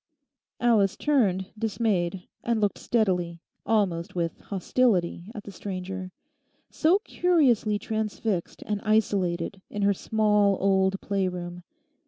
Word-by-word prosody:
Alice 220 -5 +3
turned, 200 -11 +1
dismayed, 205 -5 -1 0.2
and 235 -1 +1
looked 205 -2 0
steadily, 180 -7 0 0.3
almost 185 -7 +1
with 170 -2 -2
hostility, 190 -3 0
at 210 - -6
the 200 - -9
stranger, 190 -1 -5 0.6
so 335 +5 +4
curiously 260 - +2
transfixed 215 -3 -3
and 210 -1 -2
isolated 195 -4 0
in 205 -1 -3
her 200 0 +4
small 210 -1 +2
old 190 0 +2
play 195 -2 0
room. 175 -1 -5
200 Hz, 115 wpm, -26 LUFS, 185-220 Hz, 0.6 s, so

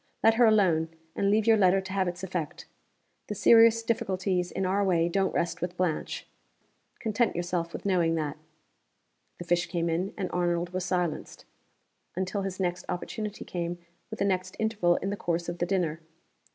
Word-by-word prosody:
Let 225 - +6
her 235 +1 +5
alone, 180 -7 +3 0.3
and 200 - +1
leave 215 +1 +3
your 225 -1 +5
letter 190 -1 +4
to 190 0 -6
have 190 -2 +1
its 180 +1 -5
effect. 175 -5 -4 0.6
The 210 - -4
serious 230 +2 +6
difficulties 190 -5 0
in 190 - -2
our 195 +2 +1
way 170 -3 +2
don't 190 +2 +1
rest 170 0 -1
with 175 0 -3
Blanche. 180 -4 -2 0.7
Content 225 +2 0
yourself 175 -1 -2
with - - -8
knowing 175 -4 +2
that." 150 -2 -2 1.0
The 175 - -8
fish 175 0 +1
came 170 -1 -1
in, 180 +4 -2
and 190 -3 -3
Arnold 175 0 0
was 185 0 -2
silenced 180 -4 -2 0.7
until 190 +2 -2
his 195 -1 -4
next 180 -1 -1
opportunity 210 +3 -4
came 175 0 -3 0.3
with 220 - -6
the 200 - 0
next 185 -1 -1
interval 210 -6 +2
in 195 - -2
the - - -1
course 170 -3 -2
of 175 0 -4
the 175 - 0
dinner. 170 -4 0
185 Hz, 180 wpm, -28 LUFS, 175-200 Hz, 1.0 s, Let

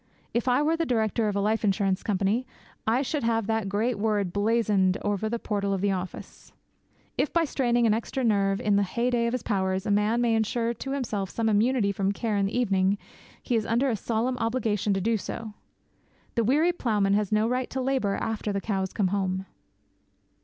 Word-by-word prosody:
If 235 +2 0
I 255 +3 +3
were 320 +2 +2
the 330 - 0
director 220 -2 +1
of 205 - -1
a - - +1
life 220 +2 0
insurance 195 -2 +1
company, 210 +5 0 0.4
I 240 +5 +2
should 295 +2 -2
have 225 -2 +1
that 220 -2 -1
great 215 +3 0
word 205 -4 0
blazoned 205 -3 +2
over 205 +1 -1
the 235 - -1
portal 200 -3 -1
of 190 - -3
the 200 0 +2
office. 185 -1 -6 0.7
If, - - +1
by 335 -1 +2
straining 240 -4 +1
an 220 - +4
extra 235 +4 -2
nerve 200 -3 +2
in 205 -1 +2
the - - +3
heyday 235 +4 0
of 235 - -2
his 255 - -2
powers, 190 -2 -1
a - - 0
man 210 +3 +2
may 240 -1 +2
ensure 230 +1 0
to 270 +3 -6
himself 215 -8 -2
some 225 +3 -1
immunity 215 0 +2
from 195 0 0
care 220 0 -2
in 200 -1 +2
the 215 - -3
evening, 195 -4 +2 0.5
he 245 - 0
is 225 - +2
under 245 +4 +2
a - - 0
solemn 235 +4 -1
obligation 225 -3 0
to 195 - -1
do 225 +3 +1
so. 215 +1 -6 0.8
The 230 - +1
weary 300 +9 +3
ploughman 210 - +1
has 205 -1 +1
no 215 +1 +3
right 250 +1 -1
to 265 - -3
labour 255 -6 0
after 220 -1 -2
the 200 - -1
cows 190 -2 -2
come 195 -4 +1
home. 190 -1 -1
220 Hz, 205 wpm, -26 LUFS, 200-235 Hz, 0.8 s, an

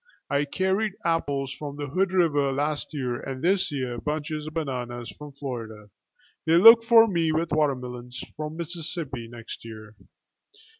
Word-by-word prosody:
I 140 +1 +2
carried 190 +6 0
apples 140 -5 0
from 145 -1 -7
the 145 0 -4
Hood 185 +7 0
river 150 -7 +2
last 145 +2 -2
year 125 -5 -2
and 135 +1 -6
this 190 0 +2
year 130 -4 -3
bunches 150 +1 -3
of 155 - -8
bananas 125 -6 -4
from 150 -1 -10
Florida; 115 -7 -7 0.6
they 160 - +5
look 225 +6 +9
for 230 -1 +7
me 170 -5 +1
with 160 +1 -1
watermelons 125 -4 -1 0.2
from 155 +1 -5
Mississippi 160 -7 -4
next 115 -1 -9
year. 110 -1 -10
145 Hz, 150 wpm, -26 LUFS, 125-165 Hz, 0.6 s, look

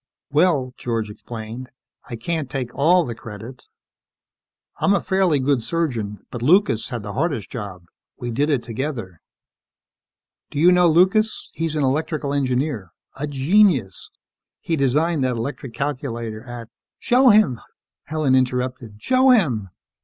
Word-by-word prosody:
"Well," 145 -5 +2
George 115 -3 -2
explained, 115 +3 -8 0.4
"I 120 - -4
can't 145 +4 -3
take 125 -3 -4
all 170 +4 +4
the 120 - -4
credit. 115 +3 -10 1.1
I'm 200 - +3
a - - +2
fairly 190 -6 +1
good 135 -1 +1
surgeon, 115 -10 -3
but 120 - -6
Lucas 165 - +3
had 120 -5 -5
the 100 0 -6
hardest 140 - -2
job. 100 -6 -7 0.3
We 120 -1 -5
did 145 +6 0
it 140 -5 +1
together. 115 - -5 1.3
Do - - -8
you 170 +5 +6
know 180 -1 +5
Lucas? 190 +7 +2
He's 160 -1 -2
an 150 - 0
electrical 150 +1 -1
engineer... 130 - -1 0.3
a 145 +2 -4
genius. 145 - +2 0.5
He 165 - -1
designed 150 +2 +1
that 130 -1 0
electronic 125 0 -5
calculator 120 -6 -4
at 120 -2 -8
" - - -70
"Show 255 +1 +4
him," 205 - +4 0.4
Helen 155 -3 0
interrupted. 125 -3 -1
"_Show 255 - +4
him! 120 - -1
135 Hz, 140 wpm, -22 LUFS, 115-160 Hz, 1.3 s, you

